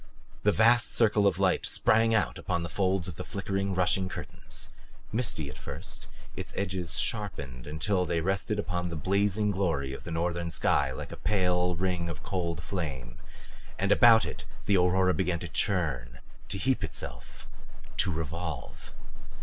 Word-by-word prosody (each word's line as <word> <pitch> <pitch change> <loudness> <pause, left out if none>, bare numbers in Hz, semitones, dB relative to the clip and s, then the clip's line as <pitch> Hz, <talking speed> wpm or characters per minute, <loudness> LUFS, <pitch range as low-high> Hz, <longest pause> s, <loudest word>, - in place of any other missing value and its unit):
A - - +5
vast 115 +3 +4
circle 105 -3 +5
of 95 -3 +2
light 95 -1 +2
sprang 115 +1 +3
out 105 - +1
upon 85 -2 -1
the 85 - -4
folds 95 0 0
of 85 -4 -6
the - - -4
flickering, 100 -1 -2
rushing 95 +1 +2
curtains. - - -6 0.4
Misty 110 - 0
at 65 - -9
first, - - -6 0.3
its - - -6
edges 95 -4 -2
sharpened 70 - -2
until 90 +5 0
they 85 0 +1
rested 95 +4 -1
upon 90 -3 -2
the 85 - -5
blazing 100 +4 +1
glory 80 -9 0
of - - -8
the - - -7
northern 85 +1 -1
sky 70 -4 +2
like 65 - -6
a - - -7
pale 90 -3 +1
ring 90 -1 -1
of 80 - -6
cold 85 -4 -2
flame. 70 -10 -4 0.6
And 100 +1 0
about 115 0 +7
it - - -6 0.2
the 100 - +3
aurora 90 0 +4
began 90 +1 0
to 85 - -6
churn, 75 - -1 0.3
to - - -2
heap - - +1
itself, - - -6 0.5
to 95 - +3
revolve. 80 -1 -5
90 Hz, 160 wpm, -29 LUFS, 80-100 Hz, 0.6 s, about